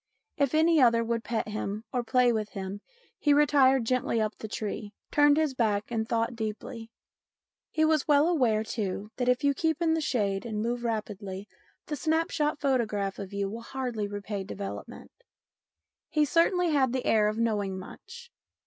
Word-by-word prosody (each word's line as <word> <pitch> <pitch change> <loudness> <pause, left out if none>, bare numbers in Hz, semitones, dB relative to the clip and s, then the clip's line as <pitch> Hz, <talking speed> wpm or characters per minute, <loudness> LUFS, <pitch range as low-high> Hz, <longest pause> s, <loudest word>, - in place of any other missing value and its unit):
If 280 0 +1
any 320 -1 +4
other 230 -2 +5
would 230 0 -2
pet 225 0 -2
him 210 0 -4
or 245 -1 0
play 245 0 +3
with 215 -2 -3
him, 195 0 -5 0.4
he 290 -1 +4
retired 270 -4 +4
gently 250 -1 0
up 215 0 -1
the 220 - -5
tree, 210 -1 -5 0.2
turned 290 0 +5
his 310 -3 +1
back 215 -3 0
and 220 -1 -2
thought 230 +1 0
deeply. 225 +1 -5 0.8
He 315 0 +2
was 310 -1 +2
well 295 +1 +5
aware, 245 -11 +2
too, 210 -2 -4
that 250 0 +1
if 250 +3 +2
you 285 0 +4
keep 320 +2 0
in 330 -2 +2
the 320 - 0
shade 200 -9 0
and 220 -3 -4
move 235 +2 -2
rapidly, 210 -3 -4 0.4
the 300 - -3
snap 320 +3 0
shot 300 -1 0
photograph 215 -8 0
of 195 -1 -6
you 200 0 -2
will 225 +4 -6
hardly 245 -4 -3
repay 205 0 -4
development. 200 0 -7 1.0
He 300 -1 +2
certainly 340 +3 +2
had 265 -4 +2
the 260 - -2
air 215 -1 +4
of 215 +1 -1
knowing 205 -4 0
much. 480 - -11
235 Hz, 175 wpm, -28 LUFS, 210-285 Hz, 1.0 s, other